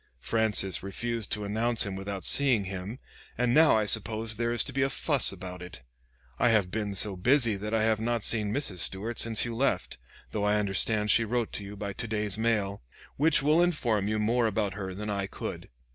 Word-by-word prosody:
Francis 105 - 0
refused 115 +3 -4
to 105 - -2
announce 110 +3 0
him 100 -1 -5
without 95 -1 -6
seeing 130 -7 +4
him, 95 +4 -6 0.4
and 120 0 +1
now 155 -4 +5
I 110 - 0
suppose 110 +1 +3
there 115 +2 -1
is 120 -2 +1
to 135 - -8
be 135 - -1
a 135 - +2
fuss 135 0 +4
about 90 -2 -9
it. 90 -8 -10 0.6
I 120 - +3
have 105 -5 +1
been 105 -1 -3
so 100 0 +1
busy 120 +3 +2
that 105 +2 -6
I 110 -1 +1
have 110 -1 +1
not 115 -1 -2
seen 105 -2 +1
Mrs. 110 -8 -2
Stuart 105 +7 0
since 115 -2 +2
you 120 -1 -5
left, 135 - -1 0.3
though 105 - -3
I 105 0 +2
understand 105 +1 0
she 115 - +4
wrote 115 0 -2
you 100 0 -9
by 100 0 -5
to 115 +3 -4
day's 105 -2 -1
mail, 105 -3 -1 0.4
which 150 -1 +3
will 155 +4 +3
inform 120 - 0
you 110 +1 -1
more 115 +2 +1
about 105 -2 -2
her 95 -3 -6
than 105 +1 -5
I 100 -1 -2
could. - - -7
110 Hz, 205 wpm, -28 LUFS, 100-120 Hz, 0.6 s, now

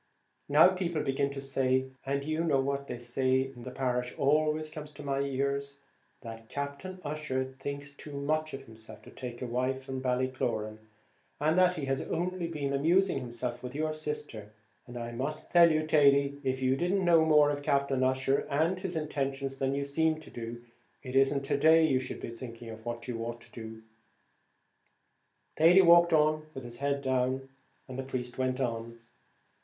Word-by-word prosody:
Now 150 +5 +7
people 175 -4 -2
begin 135 +1 0
to 140 0 -6
say 130 -1 +1 0.2
and 140 0 0
you 155 +2 -1
know 150 -5 +2
what 140 +1 -1
they 125 - -5
say 130 +2 +1
in 135 -2 -6
the 130 - -7
parish 125 -1 -2
always 155 +2 +2
comes 155 -1 -8
to 145 - -10
my 140 -1 -1
ears 140 0 -2 0.4
that 115 -2 -9
Captain 140 +7 -5
Ussher 145 -3 -2
thinks 140 +2 -7
too 140 0 -8
much 155 +1 -1
of 135 - -9
himself 110 -3 -13
to - - -13
take 125 -1 -7
a - - -1
wife 130 +2 -1
from 130 -1 -5
Ballycloran, 125 -4 -1 0.6
and 155 +2 +2
that 180 0 +4
he 150 -5 -3
has 135 0 0
only 175 +1 -2
been 145 -4 -3
amusing 165 +4 +3
himself 120 -1 -4
with 125 +1 -7
your 155 +1 -1
sister; 150 -9 -5 0.4
and 120 0 -8
I 120 0 -5
must 140 +6 -3
tell 170 -1 +7
you, 155 0 +1
Thady, 140 -2 +4
if 130 0 -1
you 130 0 +3
didn't 180 +5 0
know 165 -2 +6
more 150 -2 +5
of 145 0 -3
Captain 140 -2 +1
Ussher 130 +1 +1
and 160 +6 +1
his 185 -2 -4
intentions 135 -3 -2
than 135 0 0
you 140 - -1
seem 155 +3 +1
to - - -13
do, 115 0 -6 0.5
it 130 0 -6
isn't 135 +1 +3
to 135 - 0
day 160 +1 +6
you 135 -4 +2
should 130 - -6
be - - -5
thinking 115 -1 -9
what 120 0 -5
you 115 -2 -4
ought 120 +1 -5
to - - -17
do." 110 -1 -8 1.8
Thady 175 +4 +7
walked 170 -1 +7
on 155 0 +3
with 135 - -6
his 120 0 -8
head 140 +1 -1
down, 130 +1 0 0.4
and 130 0 -7
the - - -2
priest 125 -1 -5
went 130 0 0
on. 115 -2 -3
140 Hz, 185 wpm, -30 LUFS, 130-155 Hz, 1.8 s, Now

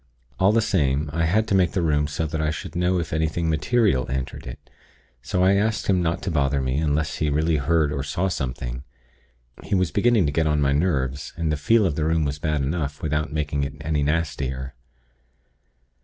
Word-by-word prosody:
All 95 - +5
the 115 0 +3
same, 75 -7 +1
I 85 +1 +1
had 110 +6 +2
to - - +1
make 90 -3 +3
the 90 - 0
room 75 -2 +2
so 80 +2 -2
that 80 0 -3
I 75 - +1
should 75 +1 -6
know 90 +1 +1
if 85 -3 -3
anything 80 +2 0
material 95 - +1
entered 65 0 -4
it; - - -9 0.5
so 90 +8 0
I 95 +1 +5
asked 105 +3 +1
him 95 -2 +2
not 85 -1 -1
to 95 - -2
bother 70 -2 +1
me, 65 +1 -1
unless 75 -1 0
he 75 - 0
really 80 +2 +1
heard 75 +1 +1
or 70 - -2
saw 85 +7 -1
something. 60 -6 -4 0.8
He 100 - -1
was 95 -2 +1
beginning 110 -2 +3
to 70 - 0
get 80 +2 +1
on 75 -1 +1
my 70 -1 +2
nerves, 70 -3 -1
and 80 -2 -1
the - - +1
'feel' 105 +9 +3
of 85 -6 0
the 75 - 0
room 80 -1 +1
was 70 0 -3
bad 75 -2 -1
enough, 75 0 -3
without 75 0 -1
making 75 -2 -1
it 70 0 -4
any 75 -1 0
nastier. 70 -4 -2
75 Hz, 210 wpm, -23 LUFS, 70-85 Hz, 0.8 s, All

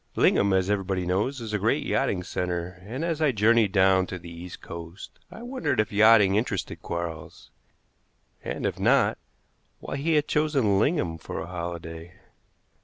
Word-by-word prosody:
Lingham, 100 - +3
as 95 -1 +2
everybody 95 -2 -1
knows, 105 +10 -1
is 115 -2 -6
a 105 - 0
great - - +1
yachting 90 -2 0
center, 90 0 -4
and 130 +9 -3
as 165 -2 -2
I 150 -3 +4
journeyed 110 -1 +3
down 95 -1 +4
to 90 - -5
the 85 -1 -11
East 85 +1 -9
Coast 85 +3 -10
I 225 - -11
wondered 205 - -2
if 105 +2 +1
yachting 105 -2 +6
interested 110 +4 -2
Quarles, 85 -2 -6 0.9
and, - - -4
if - - -2
not, - - +3 0.6
why - - -5
he 160 +3 +1
had 150 0 +2
chosen 135 -10 +2
Lingham 100 - 0
for - - -6
a - - -5
holiday. 85 -1 -7
100 Hz, 165 wpm, -26 LUFS, 90-120 Hz, 0.9 s, yachting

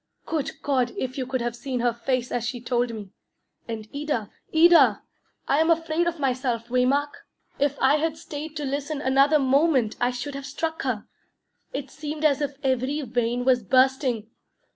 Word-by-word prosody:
Good 300 -4 -3
God, 255 -4 +1
if 255 0 -3
you 260 -2 -3
could 260 -1 -2
have 240 0 -2
seen 250 +1 -4
her 240 -1 +2
face 245 +1 -2
as 245 - -1
she 245 +1 -3
told 240 0 0
me! 210 -4 -8 0.6
And 220 -2 -5
Ida, 285 -8 -2 0.2
Ida! 320 -9 +6 0.4
I 280 - +3
am 320 +1 +3
afraid 330 +1 +1
of 340 0 -1
myself, 250 -4 -1
Waymark. 265 +4 0 0.3
If 285 0 +1
I 265 +3 +4
had 315 0 -1
stayed 310 -1 -7
to 295 - -3
listen 285 +2 -3
another 275 +2 +4
moment, 270 -3 +2
I 245 - +3
should 250 +3 -5
have 275 0 -6
struck 320 +3 -3
her. 245 -6 -2 0.7
It 275 0 -5
seemed 305 0 -4
as 290 -1 +3
if 285 -1 -2
every 265 +3 0
vein 245 -1 -1
was 255 -2 +4
bursting. 255 -1 +2
265 Hz, 175 wpm, -25 LUFS, 245-295 Hz, 0.7 s, Ida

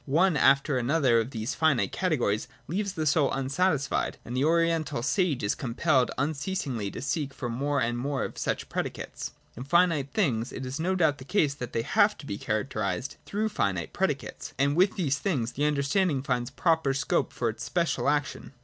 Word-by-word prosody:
One 165 +5 +3
after 140 -1 +4
another 130 -2 +3
of 115 +2 -2
these 110 -3 -3
finite 155 -6 +2
categories 125 - 0 0.2
leaves 195 +5 -2
the 155 - -2
soul 145 -1 +3
unsatisfied, 140 +2 0
and 120 - -5
the 130 - +1
Oriental 165 -5 +1
sage 155 - +1
is 100 - +1
compelled 130 +1 +1
unceasingly 140 - -2
to - - -7
seek 140 -1 -2
for 120 - -4
more 140 +4 0
and 120 0 0
more 140 +1 -1
of - - -5
such - - -2
predicates. - - -4 0.2
In 125 - -6
finite 160 -2 +2
things 125 - 0
it 130 - -6
is 130 +4 -4
no 185 +4 0
doubt 155 -5 +2
the - - -8
case 155 -2 +1
that 125 -4 -6
they 115 - 0
have 210 - +3
to 145 - -11
be 100 -6 -5
characterised 110 +1 -2
through 215 +2 -1
finite 95 - -1
predi - - +1
cates: - - -9
and 140 +2 +2
with 185 +3 +3
these 145 -9 0
things 130 - -1
the 145 +4 -1
understanding 145 +1 +1
finds 125 -3 -1
proper 160 -1 +1
scope 165 +4 0
for 120 - -2
its 110 - -3
special 170 -4 0
action. 145 -2 -2
140 Hz, 190 wpm, -28 LUFS, 125-165 Hz, 0.2 s, after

